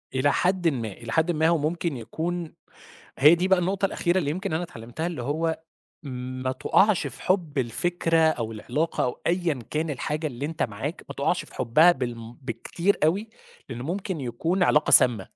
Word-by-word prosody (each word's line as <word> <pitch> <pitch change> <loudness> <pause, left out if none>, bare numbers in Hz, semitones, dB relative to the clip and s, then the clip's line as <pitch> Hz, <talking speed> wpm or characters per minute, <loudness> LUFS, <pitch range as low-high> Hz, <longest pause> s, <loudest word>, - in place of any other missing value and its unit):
إلى 135 +2 +3
حدٍ 180 -1 +1
ما، 120 -8 -1
إلى 115 +3 -9
حدٍ 160 +6 +2
ما، 160 -1 +2
هو 170 0 +3
ممكن 160 0 -2
يكون 165 +8 -4 0.7
هي 150 +5 +8
دي 180 +2 0
بقى 190 -1 +4
النُقطة 190 +3 0
الأخيرة 175 -2 0
اللي 150 -6 0
يمكن 190 +2 -3
أنا 160 +3 0
اتعلِّمتها 120 +1 -6
اللي 165 -8 -4
هو 160 +5 -1 0.4
ما 130 -1 -4
تقعش 190 +8 +2
في - - -10
حُبّ 175 -6 0
الفكرة 165 +7 0
أو 140 -9 +2
العلاقة 150 +9 -2
أو 125 - -3
أيًا 170 -7 0
كان 155 +1 -1
الحاجة 150 +3 -2
اللي 135 0 -5
أنت 160 +1 -2
معاك، 100 -4 -4
ما - - -7
تقعش - - 0
في - - -16
حُبّها 130 +8 +5
بالم 120 -5 -5
بالكتير 135 - -1
أوي، 200 +8 0 0.4
لإن 120 -2 -6
ممكن 180 +2 -3
يكون 160 +10 0
علاقة 150 -3 +3
سامّة 115 -6 +5
155 Hz, 180 wpm, -25 LUFS, 125-175 Hz, 0.7 s, هي